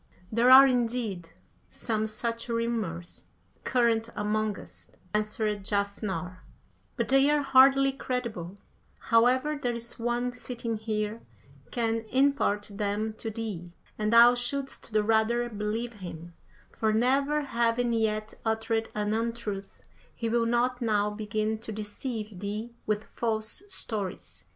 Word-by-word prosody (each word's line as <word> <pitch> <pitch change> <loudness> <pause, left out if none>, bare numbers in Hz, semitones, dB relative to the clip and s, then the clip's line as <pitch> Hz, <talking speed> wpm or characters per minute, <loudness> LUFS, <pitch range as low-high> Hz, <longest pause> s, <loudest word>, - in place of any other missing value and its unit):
"There 235 +3 +4
are, 265 +1 +11
indeed, 230 -8 0 0.4
some 220 -2 -2
such 230 +2 -3
rumours 225 -8 -3 0.4
current 230 -2 +2
among 215 0 0
us," - - -12 0.2
answered 210 -1 -1
Jafnhar, 200 -3 -2 0.6
"but - - -2
they 270 +1 +5
are 295 -1 +2
hardly 270 0 +6
credible; 235 -9 -4 0.4
however, 255 +5 +3
there 245 -2 0
is 235 0 -7
one 240 +1 0
sitting 240 -2 -4
here 215 0 -2 0.5
can 225 -1 -1
impart 265 -6 +2
them 210 +1 -1
to 225 - -4
thee, 205 -6 -5 0.2
and 215 0 -1
thou 235 +1 +8
shouldst 245 +1 -2
the 215 -1 +2
rather 225 +2 +2
believe 220 +2 -3
him, 175 -4 -9 0.4
for 220 -1 0
never 275 +6 +2
having 235 -2 +1
yet 215 -1 0
uttered 225 0 0
an 210 0 0
untruth, 225 -3 -4 0.3
he 230 - -3
will 230 0 +2
not 245 +2 +1
now 210 -2 +1
begin 215 +1 -2
to 225 0 -7
deceive 215 -1 -5
thee 210 +4 -4
with 215 0 0
false 220 +4 -2
stories." 210 - -4
225 Hz, 125 wpm, -28 LUFS, 210-240 Hz, 0.6 s, are